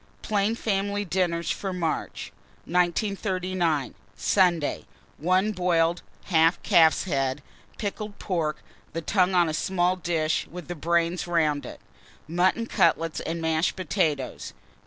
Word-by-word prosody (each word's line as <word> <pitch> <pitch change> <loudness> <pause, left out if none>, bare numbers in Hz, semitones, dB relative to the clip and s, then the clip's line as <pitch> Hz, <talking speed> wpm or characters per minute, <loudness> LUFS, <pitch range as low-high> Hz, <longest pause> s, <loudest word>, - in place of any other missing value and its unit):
PLAIN 210 +1 +1
FAMILY 205 -2 -1
DINNERS 175 -2 0
FOR 195 - -3
MARCH. 170 -3 -3 0.3
1939. 180 - 0 0.2
Sunday. 175 - +1 0.3
1. 185 +6 +2
Boiled 175 -3 +1 0.3
1/2 165 -2 +4
calf's 160 -3 +5
head, 135 -5 -1 0.3
pickled 210 0 -5
pork, 165 -6 -2 0.3
the 165 +1 -4
tongue 185 +1 +2
on 175 -1 +4
a 155 - -2
small 180 +2 +1
dish 165 -3 -1
with 175 -2 -9
the 175 - -3
brains 170 +2 0
round 155 -4 +1
it; - - -9 0.5
mutton 180 +7 +1
cutlets 165 -7 +1
and 165 0 -4
mashed 160 +1 +1
potatoes. 160 -7 -2
175 Hz, 120 wpm, -26 LUFS, 160-190 Hz, 0.5 s, calf's